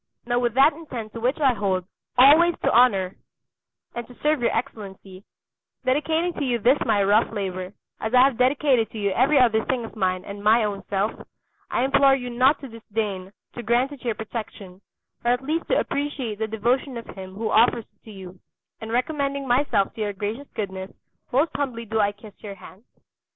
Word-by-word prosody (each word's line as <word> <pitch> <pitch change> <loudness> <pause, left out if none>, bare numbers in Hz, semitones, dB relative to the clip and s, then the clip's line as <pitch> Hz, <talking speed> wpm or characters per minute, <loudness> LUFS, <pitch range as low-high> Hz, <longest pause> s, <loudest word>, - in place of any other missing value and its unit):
Now 240 0 +1
with 240 -1 -1
that 275 +4 +6
intent 250 -9 -8
to 230 - -6
which 250 +6 0
I 270 -4 +4
hold, 190 -4 -1 0.3
always 315 +7 +7
to - - +2
honour 200 -6 +3 0.8
and 240 -1 -6
to 245 - -15
serve 300 -3 +2
your 235 - +2
Excellency, 195 -6 -6 0.6
dedicating 315 +6 +1
to 295 - -4
you 245 -3 0
this 250 +6 +3
my 200 -1 +3
rough 205 +4 +3
labour, 185 -3 -4 0.3
as 220 - -3
I 250 0 +6
have 270 -2 +3
dedicated 255 -2 +2
to - - -10
you 200 -2 0
every 265 +8 +3
other 225 -4 +4
thing 250 -3 -2
of 225 - -11
mine 185 -3 -1
and 200 0 -8
my 220 +2 +4
own 205 -2 -3
self, 200 +2 0 0.6
I - - 0
implore 275 0 +4
you 250 -2 -5
not 260 +4 +3
to 275 - -7
disdain 210 -5 -5 0.2
to 240 - -6
grant 240 +4 +1
it 285 -4 -11
your 235 -3 -1
protection, 205 -4 -8 0.4
or 240 +1 +3
at 250 +2 -3
least 315 +4 -2
to - - +2
appreciate 280 -7 -3
the 220 - -1
devotion 240 +4 -1
of 230 - -7
him 190 -1 -10
who 220 +1 -3
offers 230 0 +3
it - - -45
to 220 - -11
you; 185 -2 -11 0.4
and 220 0 -7
recommending 275 +2 -1
myself 245 -5 +1
to 225 - -7
your 205 -1 -1
gracious 210 +8 -5
goodness, 190 -3 -4 0.4
most 280 +6 +2
humbly 255 -5 -3
do 220 +1 -2
I 205 -1 +3
kiss 205 0 -14
your 200 -2 -8
hand. 190 +2 -15
230 Hz, 200 wpm, -24 LUFS, 205-265 Hz, 0.8 s, always